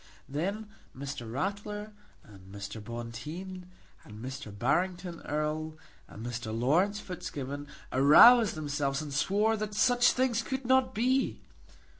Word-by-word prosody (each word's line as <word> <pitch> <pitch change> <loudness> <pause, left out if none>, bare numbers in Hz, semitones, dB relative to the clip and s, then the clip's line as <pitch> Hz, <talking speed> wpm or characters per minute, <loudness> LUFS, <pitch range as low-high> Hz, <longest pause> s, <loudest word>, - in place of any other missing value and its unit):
Then 200 +9 -3 0.3
Mr. 135 -4 -6
Ratler, 205 - -4 0.3
and 95 -2 -15
Mr. 100 +2 -7
Bonteen, 150 - -7 0.4
and 105 - -12
Mr. 130 -1 -7
Barrington 175 - -1
Erle, 155 +1 -2 0.3
and 110 - -9
Mr. 120 -2 -4
Laurence 180 - +2
Fitzgibbon 145 -6 -6 0.3
aroused 205 - +7
themselves 145 -1 -2
and 145 -2 -7
swore 205 +9 +2
that 210 0 -4
such 245 +1 +4
things 250 -3 +1
could 265 +2 -4
not 260 -1 +3
be. 255 +4 +1
155 Hz, 120 wpm, -30 LUFS, 130-210 Hz, 0.4 s, aroused